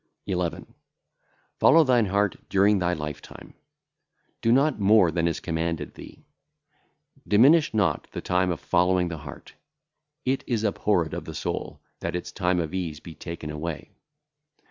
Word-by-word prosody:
11. 90 -3 -3 0.9
Follow 165 0 +6
thine 120 -6 +3
heart 100 +1 +1
during 100 +1 +3
thy 90 -1 +1
lifetime; 75 -4 -7 0.9
do 115 - +2
not 135 +1 +3
more 100 -3 +5
than 85 +1 0
is 85 - -1
commanded 85 0 -3
thee. - - -13 1.0
Diminish 140 +10 +5
not 105 -3 0
the - - -5
time 90 0 0
of 85 - -2
following 90 0 +2
the 80 -2 -6
heart; 75 -2 -11 0.7
it 130 +1 0
is 115 -3 -1
abhorred 100 -5 0
of - - -5
the - - -8
soul, - - -4 0.2
that - - -3
its 90 - -5
time 90 -2 0
[of 80 -1 -3
ease] 85 -5 -3
be 80 - -11
taken 80 0 -7
away. 75 +1 -6
90 Hz, 145 wpm, -25 LUFS, 85-105 Hz, 1.0 s, Follow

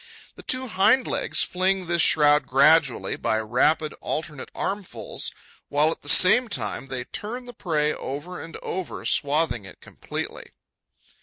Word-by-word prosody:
The - - -13
two 255 0 0
hind 220 +5 +3
legs - - 0
fling 185 +1 0
this 170 0 +1
shroud 150 -2 +4
gradually, 140 0 +3
by 110 - -1
rapid 140 +8 +1
alternate 155 -3 -4
armfuls, 200 -2 -3 0.4
while, 150 +2 +2
at - - -7
the - - -5
same 225 +7 +6
time, 125 - -3
they 130 -2 -3
turn 235 - -7
the 245 - -10
prey 150 -7 0
over 145 +7 -6
and 165 - -9
over, 185 -1 -5
swathing 145 -5 +1
it 95 - -13
completely. - - -7
160 Hz, 145 wpm, -24 LUFS, 140-190 Hz, 0.4 s, same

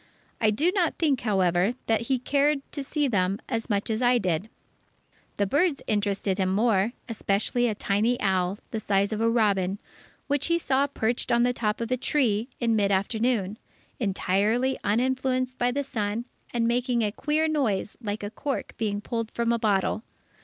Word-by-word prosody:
I 220 - +4
do 295 +12 +2
not 360 -5 +1
think, 290 -6 +1
however, 190 0 +2
that 225 +1 0
he 265 - +3
cared 280 +2 +1
to 285 - -3
see 295 +1 0
them 195 -4 +1
as 230 -2 -3
much 205 +1 0
as 220 +2 -1
I 245 0 +4
did. 185 -1 -1 0.9
The 200 - +1
birds 290 - +1
interested 200 -2 0
him 190 -1 +2
more, 210 +1 +2
especially 225 +2 0
a 215 - -1
tiny 215 +5 +1
owl, 190 -1 +1
the 220 - -2
size 200 0 +1
of 215 - -2
a 230 - +3
robin, 200 -5 +2 0.5
which 285 +2 0
we 335 - +3
saw 280 -3 +1
perched 240 -2 -1
on 235 0 +4
the 245 0 +2
top 215 -3 -1
of 230 +1 -3
a 255 - +2
tree, 235 -5 +1
in 230 -2 +2
mid 205 -2 +2
afternoon, 215 +1 0 0.4
entirely 215 +4 +1
uninfluenced 255 +3 0
by 245 - +2
the 285 +3 -1
sun, 220 -3 -2 0.3
and 230 -1 +1
making 240 0 +1
a 210 - 0
queer 300 +7 0
noise 245 -11 0
like 210 -2 -4
a 205 - -4
cork 275 +5 -4
being 205 -2 -1
pulled 230 0 -3
from 235 0 0
a 235 - 0
bottle. 210 -1 +1
230 Hz, 180 wpm, -26 LUFS, 205-255 Hz, 0.9 s, I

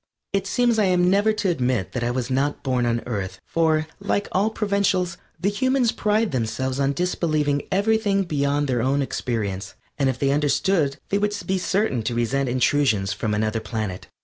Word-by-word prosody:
It 195 0 0
seems 240 +1 +2
I 210 - +4
am 180 -1 +3
never 205 +3 +3
to 210 -3 0
admit 125 - 0
that 125 - -3
I 120 - 0
was 125 +1 -2
not 140 +3 0
born 125 -3 +1
on 115 0 0
Earth, 95 -6 -4
for, 160 -2 +1
like 200 0 -1
all 200 +4 +2
provincials, 200 -4 0 0.2
the 190 +4 +1
humans 260 +1 +2
pride 215 0 +1
themselves 130 +2 -2
on 140 0 +2
disbelieving 155 -4 0
everything 200 0 +2
beyond 145 -3 0
their 125 -3 0
own 135 +3 +1
experience, 105 -7 -3 0.2
and 135 -1 +3
if 130 - -2
they 135 +1 +1
understood 145 +1 +1
they 200 - +1
would 205 0 0
be 190 0 0
certain 190 - 0
to 115 +2 -2
resent 125 +3 0
intrusions 120 -5 +2
from 105 0 -2
another 110 +1 0
planet. 110 -4 -4
145 Hz, 180 wpm, -23 LUFS, 120-195 Hz, 0.2 s, I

